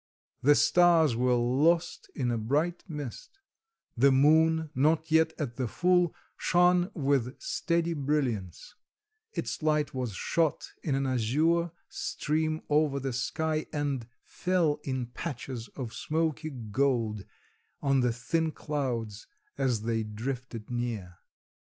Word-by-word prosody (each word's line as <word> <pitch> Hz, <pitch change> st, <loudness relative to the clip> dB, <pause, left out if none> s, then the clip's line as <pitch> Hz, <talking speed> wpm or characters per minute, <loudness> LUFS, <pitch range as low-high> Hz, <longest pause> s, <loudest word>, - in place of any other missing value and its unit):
The 145 Hz, +2 st, +6 dB
stars 170 Hz, -7 st, +5 dB
were 125 Hz, +1 st, +2 dB
lost 150 Hz, +9 st, +1 dB
in 125 Hz, -4 st, 0 dB
a 115 Hz, -, 0 dB
bright 150 Hz, +10 st, 0 dB
mist; 150 Hz, -, -7 dB, 0.6 s
the 135 Hz, +3 st, +5 dB
moon, 160 Hz, +3 st, +4 dB
not 155 Hz, +4 st, +2 dB
yet 160 Hz, 0 st, +4 dB
at 125 Hz, -6 st, -4 dB
the 130 Hz, -2 st, -1 dB
full, 180 Hz, +5 st, +2 dB, 0.2 s
shone 180 Hz, +1 st, +3 dB
with 135 Hz, -5 st, 0 dB
steady 170 Hz, 0 st, 0 dB
brilliance; 135 Hz, -, -2 dB, 0.6 s
its -, -, -4 dB
light 150 Hz, -2 st, +1 dB
was 125 Hz, -5 st, -3 dB
shot 160 Hz, -, 0 dB
in 140 Hz, -, -1 dB
an 135 Hz, 0 st, 0 dB
azure 150 Hz, +8 st, +1 dB, 0.2 s
stream 155 Hz, +1 st, -2 dB
over 150 Hz, -2 st, +2 dB
the 135 Hz, -1 st, -3 dB
sky, 155 Hz, +5 st, -1 dB
and 145 Hz, -6 st, -2 dB, 0.2 s
fell 175 Hz, -5 st, 0 dB
in 130 Hz, -2 st, -2 dB
patches 125 Hz, -2 st, -6 dB
of 120 Hz, -4 st, -5 dB
smoky 155 Hz, +1 st, -1 dB
gold 115 Hz, -4 st, -1 dB, 0.6 s
on 140 Hz, -1 st, +2 dB
the 125 Hz, -1 st, +2 dB
thin 160 Hz, +8 st, -1 dB
clouds 125 Hz, -10 st, -3 dB, 0.3 s
as 120 Hz, -5 st, 0 dB
they 115 Hz, 0 st, 0 dB
drifted 115 Hz, +1 st, -5 dB
near. 115 Hz, -8 st, -4 dB
140 Hz, 125 wpm, -29 LUFS, 120-160 Hz, 0.6 s, The